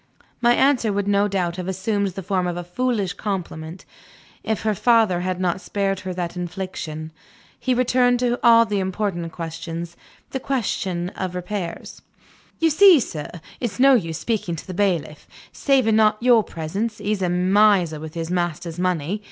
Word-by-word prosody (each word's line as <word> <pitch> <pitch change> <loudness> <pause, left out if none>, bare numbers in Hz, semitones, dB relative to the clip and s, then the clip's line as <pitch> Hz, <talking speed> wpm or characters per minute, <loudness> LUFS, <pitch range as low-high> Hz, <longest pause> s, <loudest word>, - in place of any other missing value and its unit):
My 240 0 +5
answer 265 -5 +3
would 200 0 -1
no 205 0 +3
doubt 180 -3 -1
have 180 -1 -5
assumed 200 +2 -1
the 195 0 -6
form 185 -1 0
of 175 0 -3
a 175 - -4
foolish 205 +1 -1
compliment, 175 -4 -5 0.6
if 220 - -2
her 215 -1 +1
father 220 -3 +3
had 185 0 -2
not 185 0 -1
spared 195 -2 -1
her 185 0 -5
that 175 -1 -4
infliction. 175 -3 -5 0.5
He 255 -1 0
returned 245 0 +3
to 245 -1 +2
the 245 - -1
all 230 -1 +7
important 190 -3 -2
question, 165 +1 -5 0.4
the 265 - -2
question 190 -9 -2
of 185 -2 -5
repairs. 180 -1 -5 0.6
"You 325 -1 +3
see, 370 0 +7
sir, 155 - -5 0.3
it's 240 -2 -4
no 275 +1 +7
use 165 -10 +1
speaking 205 -6 -2
to 155 - -9
the 185 - -7
bailiff. 170 -6 -1 0.3
Saving 255 -6 +2 0.2
your 235 -2 +5
presence, 200 +8 -4
he's 205 -1 -2
a 180 - +1
miser 180 -2 +3
with 160 +1 -8
his 165 0 -4
master's 175 -1 -2
money. 180 +1 -1
190 Hz, 165 wpm, -22 LUFS, 175-220 Hz, 0.6 s, all